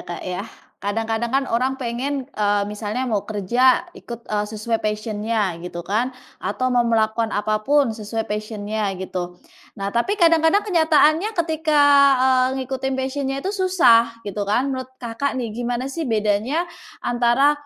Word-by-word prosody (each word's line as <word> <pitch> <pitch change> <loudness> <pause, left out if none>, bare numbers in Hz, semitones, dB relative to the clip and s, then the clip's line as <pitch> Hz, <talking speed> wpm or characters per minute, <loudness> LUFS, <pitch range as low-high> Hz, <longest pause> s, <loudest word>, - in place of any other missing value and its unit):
Kak, 175 -1 -7
yah, 180 -1 -4 0.3
kadang-kadang 225 +3 -1
kan 270 +3 +1
orang 260 +2 0
pengen, 260 +3 -3
eee, 205 -1 +1
misalnya 210 +4 -3
mau 215 -6 -2
kerja 235 +5 +2
ikut, 235 -1 -9
eee, 210 -1 -1
sesuai 220 +1 -2
passion-nya 215 -1 -1
gitu 175 0 -7
kan. 220 +7 0 0.3
Atau 255 0 -1
mau 245 - +4
melakukan 225 0 +1
apapun 215 +6 +1
sesuai 220 +1 -4
passion-nya 210 0 -3
gitu, 180 -1 -5 0.4
nah 200 -1 -4
tapi 240 - 0
kadang-kadang 335 +2 +4
kenyataannya 320 0 +3 0.2
ketika, 315 -2 +1 0.4
eee, 260 0 +2
ngikutin 265 +1 -3
passion-nya 270 +1 -2
itu 390 - -1
susah 245 - +4
gitu 205 0 -4
kan. 255 +6 +1
Menurut 260 -1 -5
Kakak 250 +3 -3
nih 235 -4 -3
gimana 245 +3 -3
sih 325 -5 -3
bedanya 220 +8 +1 0.4
antara 245 +4 +3
235 Hz, 145 wpm, -21 LUFS, 215-270 Hz, 0.4 s, mau